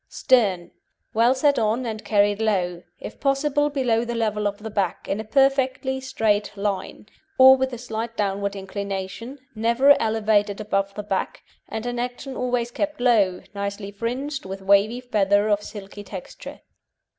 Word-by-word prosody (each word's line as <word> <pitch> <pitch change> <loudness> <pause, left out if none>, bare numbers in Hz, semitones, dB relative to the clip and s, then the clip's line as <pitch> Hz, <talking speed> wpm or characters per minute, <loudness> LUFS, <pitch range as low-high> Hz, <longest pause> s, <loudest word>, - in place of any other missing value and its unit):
STERN 200 -9 +2 0.4
Well 235 +4 +4
set 285 +1 +2
on, 225 +3 0
and 220 -2 -5
carried 205 0 +2
low, 180 -5 0 0.2
if - - -9
possible 290 +1 +1
below 245 -5 +1
the 240 0 -4
level 215 -2 0
of 205 0 -3
the 215 +1 -8
back, 200 -2 -2
in 200 - -2
a - - -3
perfectly 265 +1 +1
straight 210 -5 0
line, 200 0 -3 0.3
or 265 0 +9
with 265 0 -1
a 245 - -5
slight 230 -1 -5
downward 200 0 -1
inclination, 200 +5 -5 0.2
never 235 +6 +4
elevated 215 -2 +1
above 195 -2 -1
the 210 - -5
back, 195 -2 -3 0.3
and 220 +1 -5
in 245 0 -3
action 250 +2 -5
always 245 -1 -1
kept 300 +2 -3
low, 210 -7 +2
nicely 200 0 -4
fringed, 255 +7 -4
with 190 0 -7
wavy 200 +5 +3
feather 205 -4 +2
of 205 -1 +2
silky 205 -1 -9
texture. 190 -2 -9
220 Hz, 155 wpm, -23 LUFS, 200-250 Hz, 0.4 s, or